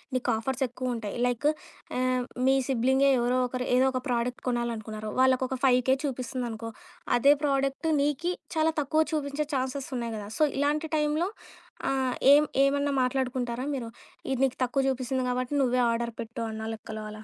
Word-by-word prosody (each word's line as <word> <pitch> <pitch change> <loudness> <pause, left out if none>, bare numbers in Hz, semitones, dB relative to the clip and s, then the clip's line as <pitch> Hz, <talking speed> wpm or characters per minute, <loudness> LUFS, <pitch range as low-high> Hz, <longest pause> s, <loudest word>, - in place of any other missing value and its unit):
నీకు 255 0 -1
ఆఫర్సెక్కువ 255 +1 -2
ఉంటాయి. 215 -3 -5
లైకు 245 +4 +1 0.5
ఆహ్, 255 0 +1 0.2
మీ 270 - +5
సిబ్లింగే 265 +2 +3
ఎవరో 245 +1 +1
ఒకరు 250 0 -3
ఏదో 255 +1 +4
ఒక 255 -1 -2
ప్రోడక్ట్ 245 0 -1
కొనాలనుకున్నారు. 220 -3 -3
వాళ్ళకొక 260 0 +3
5 255 -1 +5
కే 265 - +6
చూపిస్తుందనుకో 245 -4 -4 0.5
అదే 280 +4 +6
ప్రోడక్టు 275 +1 0
నీకి 295 +5 0 0.2
చాలా 320 0 +2
తక్కువ 310 +3 +2
చూపించే 295 0 -1
ఛాన్సెస్ 265 +1 -2
ఉన్నాయి 235 -1 -3
గదా! 205 -1 -6
సో, - - +5
ఇలాంటి 295 +3 +1
టైంలో 305 +4 +1 0.6
ఆహ్, 265 -2 0 0.2
ఏం 295 +1 +7 0.2
ఏమన్నా 280 +1 +2
మాట్లాడుకుంటారా 250 -1 -1
మీరు. 245 -4 -4 0.4
ఇది 265 - 0
నీకు 260 - -3
తక్కువ 260 +2 0
చూపిస్తుంది 260 0 -1
కాబట్టి 250 +2 -2
నువ్వే 250 -1 +2
ఆర్డర్ 235 0 -2
పెట్టు 230 +1 -6
అన్న 220 0 -5
లెక్కలో 220 0 -7
అలా. 215 0 -10
255 Hz, 155 wpm, -28 LUFS, 240-275 Hz, 0.6 s, ఏం